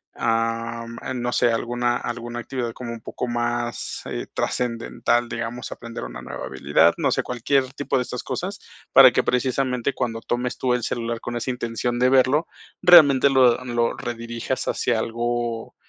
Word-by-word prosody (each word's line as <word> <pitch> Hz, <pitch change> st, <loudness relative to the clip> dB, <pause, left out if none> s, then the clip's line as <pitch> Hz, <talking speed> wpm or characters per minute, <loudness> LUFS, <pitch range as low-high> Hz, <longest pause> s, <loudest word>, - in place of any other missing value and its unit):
am, 115 Hz, 0 st, -1 dB
am, 130 Hz, -2 st, -4 dB
no 120 Hz, 0 st, -1 dB
sé, 120 Hz, -, +3 dB
alguna 120 Hz, +1 st, 0 dB
alguna 120 Hz, 0 st, -5 dB
actividad 120 Hz, -2 st, -4 dB
como 120 Hz, -2 st, -7 dB
un 115 Hz, -, -9 dB
poco 125 Hz, -, -5 dB
más, 120 Hz, 0 st, -2 dB
eh, -, -, -5 dB
trascendental, 120 Hz, 0 st, -1 dB
digamos, 115 Hz, +2 st, -5 dB
aprender 115 Hz, -1 st, -7 dB
una -, -, -7 dB
nueva -, -, -6 dB
habilidad. 75 Hz, +5 st, +3 dB
No -, -, +1 dB
sé, -, -, +1 dB
cualquier 130 Hz, +2 st, 0 dB
tipo 140 Hz, -1 st, -1 dB
de 125 Hz, -, +1 dB
estas 125 Hz, 0 st, -6 dB
cosas, 185 Hz, +10 st, -4 dB, 0.3 s
para 130 Hz, -2 st, +9 dB
que -, -, +1 dB
precisamente, 125 Hz, 0 st, 0 dB
cuando 115 Hz, -2 st, -2 dB
tomes 125 Hz, +1 st, -2 dB
tú 125 Hz, -1 st, +1 dB
el 125 Hz, -2 st, -1 dB
celular 115 Hz, -1 st, -2 dB
con 120 Hz, 0 st, -5 dB
esa 120 Hz, +2 st, -2 dB
intención 120 Hz, 0 st, -2 dB
de 125 Hz, 0 st, +4 dB
verlo, 135 Hz, +4 st, +3 dB, 0.3 s
realmente 150 Hz, -7 st, +7 dB
lo 130 Hz, -2 st, +4 dB
lo 120 Hz, -1 st, 0 dB
redirijas 120 Hz, +2 st, -4 dB
hacia 120 Hz, -3 st, 0 dB
algo, 120 Hz, 0 st, -2 dB
120 Hz, 165 wpm, -23 LUFS, 115-125 Hz, 0.3 s, para